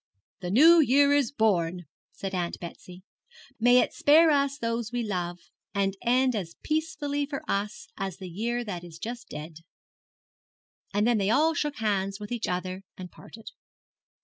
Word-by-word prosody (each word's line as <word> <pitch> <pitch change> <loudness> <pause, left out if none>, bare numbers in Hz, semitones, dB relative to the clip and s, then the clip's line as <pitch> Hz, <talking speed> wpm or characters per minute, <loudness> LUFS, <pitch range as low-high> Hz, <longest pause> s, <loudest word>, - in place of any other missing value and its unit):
'The 180 -2 -5
New 320 - +7
Year 285 0 +5
is 285 -5 +2
born,' 180 - +1 0.3
said 195 -1 -6
Aunt 175 -2 -2
Betsy; 180 +1 -10 0.6
'may 245 +2 +5
it - - -2
spare 315 +2 +5
us 280 -1 +1
those 230 -2 -2
we 245 -1 -1
love, 175 -4 -3 0.4
and 195 -1 +1
end 255 +1 +2
as 175 -5 -4
peacefully 295 -2 -1
for 275 -2 -5
us 205 +2 -3
as 195 -3 -4
the 190 - -8
year 235 +7 -2
that 180 -6 -6
is 170 -2 -11
just 235 +6 -7
dead.' 155 +1 -8 1.3
And 205 +1 +1
then 235 -2 +3
they 195 0 +1
all 310 +8 +3
shook 295 -2 -2
hands 195 -4 -1
with 210 +1 -8
each 240 -3 -2
other 185 +1 -3 0.2
and 180 -1 -8
parted. 225 0 -12
220 Hz, 165 wpm, -27 LUFS, 185-275 Hz, 1.3 s, New